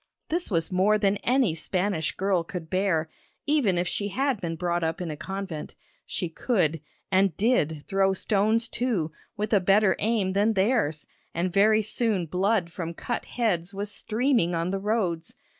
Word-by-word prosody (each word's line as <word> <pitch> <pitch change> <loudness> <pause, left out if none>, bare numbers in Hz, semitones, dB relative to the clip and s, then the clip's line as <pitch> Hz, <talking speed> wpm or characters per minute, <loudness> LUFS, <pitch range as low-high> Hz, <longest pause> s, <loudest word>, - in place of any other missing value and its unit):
This 345 +2 0
was 165 -3 0
more 195 +4 +3
than 205 -1 +2
any 245 -5 +2
Spanish 180 0 -1
girl 190 -3 +1
could 165 -1 -7
bear, 185 -4 +1 0.4
even 280 -12 +2
if 175 +1 0
she 205 - -2
had 265 +1 -1
been 165 -2 -3
brought 175 0 -1
up 160 0 -1
in 175 -3 -3
a - - -4
convent. 190 -2 -6 0.3
She 180 - -2
could 165 - 0 0.3
and 190 -3 +3
did 160 - +1
throw 195 0 +2
stones 215 +4 +1
too, 220 -12 -1 0.3
with 210 +2 -2
a 205 - +6
better 195 +1 +4
aim 210 -4 +1
than 205 +3 +2
theirs, 195 - +1 0.3
and 175 +1 -1
very 215 +2 +4
soon 215 -4 +1
blood 185 +1 0
from 170 0 -5
cut 240 - -3
heads 195 -6 -1
was 205 +1 -3
streaming 225 -6 +1
on 165 +2 -1
the 195 - -1
roads. 205 -1 -1
195 Hz, 170 wpm, -26 LUFS, 170-215 Hz, 0.4 s, a